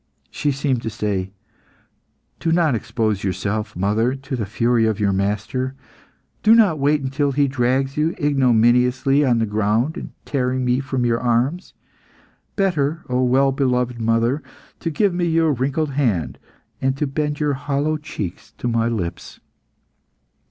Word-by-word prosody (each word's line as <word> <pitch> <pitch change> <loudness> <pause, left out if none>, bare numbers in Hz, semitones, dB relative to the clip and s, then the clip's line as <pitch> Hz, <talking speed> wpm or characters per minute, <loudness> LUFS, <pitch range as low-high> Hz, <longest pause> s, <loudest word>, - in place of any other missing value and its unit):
She 145 - 0
seemed 135 -3 -1
to 110 - -3
say 100 -3 -2 1.1
"Do 165 - 0
not 165 -4 +3
expose 110 -3 -1
yourself, 100 +3 -2
mother, 105 +7 +1
to 135 0 -5
the 110 -5 -3
fury 115 +2 +2
of 110 -2 -1
your 100 -2 +2
master. 105 +7 -2 0.7
Do 220 +1 +6
not 200 -10 +4
wait 145 +1 +2
until 140 +1 -1
he 140 +1 +2
drags 135 +1 0
you 155 +3 +1
ignominiously 130 0 +3
on 125 -4 +3
the 115 - +1
ground 110 +7 0
in - - -7
tearing 130 -1 -1
me 125 +1 +2
from 130 -2 -2
your 115 -1 +1
arms. 125 +9 0 0.8
Better, 165 -5 0
O 125 0 +1
well 135 +2 +3
beloved 125 -3 0
mother, 115 +5 +1 0.4
to 165 - -2
give 190 +5 +1
me 175 0 0
your 165 -2 +2
wrinkled 140 +4 -1
hand, 105 - -1 0.4
and 135 +1 -1
bend 150 0 -1
your 150 -2 +1
hollow 145 +2 -1
cheeks 110 - -7
to - - -5
my 115 -1 +1
lips." 100 -8 -4
130 Hz, 150 wpm, -21 LUFS, 115-145 Hz, 1.1 s, Do